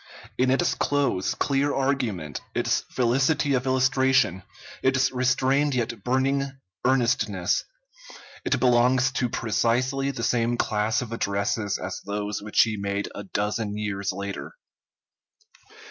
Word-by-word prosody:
In 130 0 +2
its 135 +7 +2
close, 130 -7 0
clear 140 +2 +1
argument, 125 - -1
its - - 0
felicity 135 +4 +1
of 130 0 0
illustration, 130 - +2 0.4
its 130 0 +2
restrained 130 +2 +2
yet 120 -4 -2
burning 135 +2 0 0.3
earnestness, 115 -7 +1 0.8
it 135 - +1
belongs 125 +1 +3
to 125 -1 -1
precisely 120 +5 0
the 120 -4 -4
same 120 0 +1
class 110 +2 0
of 115 - -9
addresses 100 -1 -1
as - - -5
those 105 0 -3
which 105 +1 +3
he 110 -2 -2
made 100 0 -2
a 105 - -7
dozen 105 +1 -2
years 100 -2 -2
later. 100 - -6
120 Hz, 120 wpm, -25 LUFS, 105-130 Hz, 0.8 s, belongs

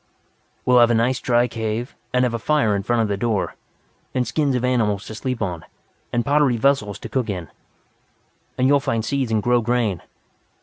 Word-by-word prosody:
"We'll 125 -1 +5
find 120 0 +6
a 120 - +3
nice 125 +3 +1
dry 120 0 +2
cave, 115 +1 -3 0.2
and 125 0 +2
have 125 -2 0
a 115 - -2
fire 130 -6 +2
in 100 - -1
front 115 +3 +1
of - - 0
the 100 -1 -1
door. 110 -2 -1 0.6
And 125 -1 +1
skins 145 -4 0
of 125 0 0
animals 110 -6 +1
to - - -8
sleep 125 0 -3
on. 85 -4 -4 0.5
And 120 -1 0
pottery 140 -4 +3
vessels 110 -5 +1
to - - -8
cook 130 -4 -2
in. 90 -5 -4 1.1
And 130 - +2
you 140 - +5
will 140 - +5
find 115 -4 -1
seeds 135 -4 -1
and 110 -2 +1
grown 120 0 +3
grain." 115 -6 0
120 Hz, 205 wpm, -22 LUFS, 110-125 Hz, 1.1 s, find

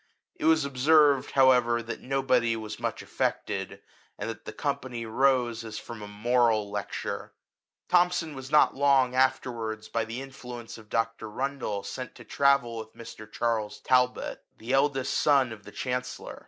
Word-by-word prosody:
It - - -5
was 160 -2 +4
observed, 140 +1 +4
however, 125 -3 +4
that 115 - -6
nobody 130 -3 +1
was 110 -1 -6
much - - -3
affected, - - -3 0.3
and - - -4
that 115 0 -12
the - - -5
company 130 -5 -3
rose 120 -1 +1
as 110 -1 -7
from 115 -3 -8
a 105 - -7
moral 110 0 +1
lecture. 105 -2 -4 0.5
Thomson 175 -3 +2
was 135 0 -8
not 150 +1 +5
long 135 -2 +3
afterwards, 120 -4 0
by 115 - 0
the 115 +3 -5
influence 125 -4 -9
of 110 -1 -16
Dr. 115 -1 -1
Rundle, 130 -4 -3
sent 130 -1 -6
to - - -12
travel 140 -4 +2
with 110 0 -8
Mr. 110 -2 -11
Charles 115 -3 -1
Talbot, 125 -1 +1 0.2
the 120 +4 -4
eldest 135 -1 +2
son 140 -4 +3
of 105 -2 -10
the 105 - -10
Chancellor. 125 +1 -4
125 Hz, 155 wpm, -28 LUFS, 115-135 Hz, 0.5 s, not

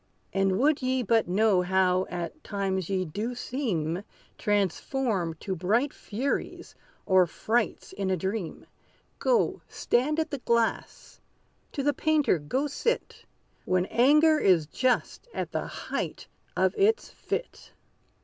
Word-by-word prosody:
And 195 -1 +2
would 290 +5 +3
ye 255 0 0
but 225 -2 +2
know 195 0 +3
how 185 0 +2
at 180 - -5
times 190 -3 -2
ye 190 -1 0
do 210 +9 -4
seem 195 - -2 0.3
Transformed 200 - -1
to 190 - -3
bright 220 - +1
furies, 250 +7 -3 0.3
or 185 -2 +5
frights 225 +7 -1
in 195 -1 -2
a 185 - +1
dream, 190 0 -4 0.5
Go, - - +2
stand 285 +6 0
at 320 - -1
the 285 - -3
glass 235 -2 -1 0.5
to 275 - -2
the 290 +1 +2
painter 305 - +2
go 255 - -1
sit, 465 - -2 0.4
When 185 0 +2
anger 300 +8 +5
is 180 - +4
just 255 - -1
at - - -3
the - - -2
height - - -5 0.3
of - - +3
its 435 +3 +3
fit! - - -5
215 Hz, 130 wpm, -27 LUFS, 185-270 Hz, 0.5 s, or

